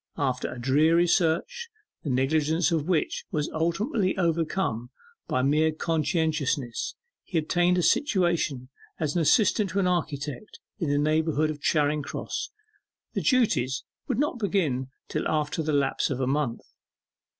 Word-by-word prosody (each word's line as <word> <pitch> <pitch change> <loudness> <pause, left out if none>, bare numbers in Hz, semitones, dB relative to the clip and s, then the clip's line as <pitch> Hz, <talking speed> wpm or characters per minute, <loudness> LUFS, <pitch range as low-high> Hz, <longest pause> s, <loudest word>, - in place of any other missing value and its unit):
After 130 -4 -1
a - - -7
dreary 155 +7 +4
search, 180 - 0 0.3
the 150 - -4
negligence 155 +6 +1
of 160 -2 0
which 175 -4 0
was 150 -1 -2
ultimately 185 - 0
overcome 165 -8 0 0.4
by 130 - 0
mere 155 +3 +3
conscientiousness, 155 -5 -1 0.3
he 180 - -3
obtained 175 +3 +2
a 180 - +1
situation 175 - +1 0.3
as 155 -1 -1
assistant 200 - +3
to 195 - -1
an 190 - +2
architect 155 0 -3 0.2
in 165 -6 -1
the 145 - +2
neighbourhood 155 0 +1
of 150 -1 -8
Charing 150 -1 +2
Cross: 140 - -4 0.6
the - - -1
duties 140 - +2 0.2
would 250 - -1
not 285 -2 0
begin 160 - 0 0.2
till - - -2
after 155 0 -1
the 155 0 -1
lapse 140 -2 +1
of 130 - -2
a 130 - +1
month. 135 -3 -1
155 Hz, 140 wpm, -26 LUFS, 145-175 Hz, 0.6 s, dreary